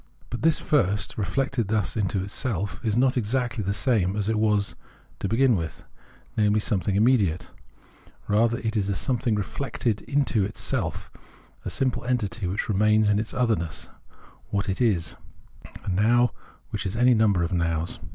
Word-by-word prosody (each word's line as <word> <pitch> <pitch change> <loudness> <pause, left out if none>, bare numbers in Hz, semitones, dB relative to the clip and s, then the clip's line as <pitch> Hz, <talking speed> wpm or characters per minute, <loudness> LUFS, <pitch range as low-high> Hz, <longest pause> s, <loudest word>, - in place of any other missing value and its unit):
But 120 - -4
this 165 +1 +3
first, 105 - +1
reflected 120 +3 -1
thus 105 -1 0
into 100 -3 0
itself, 100 -3 -2
is 110 -1 0
not 130 +1 +3
exactly 120 0 -1
the 100 - -1
same 105 -7 +1
as 105 0 -1
it 110 -1 +1
was 105 -2 +2 0.5
to - - -2
begin 120 +3 +3
with, 80 -3 -5 0.5
namely 105 0 +3
some 105 -1 0
thing 95 +1 -1
immediate: 100 -6 +2 0.8
rather 115 +3 +2
it 110 -1 -3
is 100 -2 0
a 100 - 0
something 120 -2 0
reflected 105 0 -2
into 125 -8 +1
self, - - -2 0.5
a - - -4
simple 130 -2 -1
entity 115 -5 -1
which 95 +4 -2
remains 105 +1 +3
in 105 0 +3
its 110 - -3
otherness, 110 - -1 0.6
what 100 0 -1
it 95 - -2
is: 90 - +1 0.7
a - - -2
Now 115 +6 +3 0.4
which - - -3
is 95 - -4
any 125 +2 +5
number 105 -6 +3
of 85 - -2
Nows. 85 -1 -1
105 Hz, 160 wpm, -25 LUFS, 100-120 Hz, 0.8 s, any